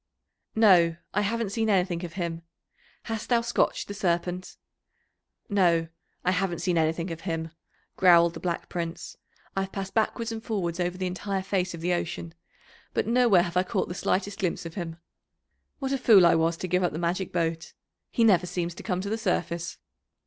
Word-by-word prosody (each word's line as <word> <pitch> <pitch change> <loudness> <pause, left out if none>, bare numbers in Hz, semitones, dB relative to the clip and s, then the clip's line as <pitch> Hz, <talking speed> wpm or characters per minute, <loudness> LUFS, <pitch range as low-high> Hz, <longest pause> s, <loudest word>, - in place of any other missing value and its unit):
"No, 180 -7 +5 0.2
I 205 - +2
haven't 220 0 -1
seen 220 +1 0
anything 185 -3 +1
of 170 -2 -6
him. 170 -2 -3 0.6
Hast 225 -1 -5
thou 240 -2 +4
scotched 235 0 0
the 205 - -5
Serpent?" 180 -2 -2 0.9
"No, 170 -6 +2 0.4
I 180 - +4
haven't 180 -2 0
seen 180 -2 +1
anything 165 +2 0
of 165 0 -6
him," 165 -3 -3 0.5
growled 170 -2 +6
the - - -7
Black 175 -2 -3
Prince. 170 -1 -5 0.4
"I've 195 0 -1
passed 195 -1 -5
backwards 230 +1 0
and 225 0 -5
forwards 185 -7 -2
over 180 0 -1
the 185 - -2
entire 190 +1 -2
face 185 -2 -1
of 165 - -9
the 175 +1 +1
ocean, 170 -1 -3 0.6
but - - +1
nowhere 230 -6 +4
have 175 -1 -5
I - - +5
caught 185 - -2
the - - -3
slightest 195 +3 -1
glimpse 180 -3 -1
of 165 - -6
him. 170 -3 -5 0.8
What 270 -2 -3
a 275 - 0
fool 210 -7 +7
I 170 - +6
was 165 0 +2
to 185 - -4
give 180 +1 +1
up 175 -4 0
the - - -3
magic 175 +2 -1
boat! 165 -1 -2 0.4
He 230 - +1
never 185 -5 +4
seems 175 -1 -2
to - - -10
come 185 -4 -2
to 200 - -4
the 225 - -1
surface." 170 -4 -2
180 Hz, 190 wpm, -27 LUFS, 170-200 Hz, 0.9 s, fool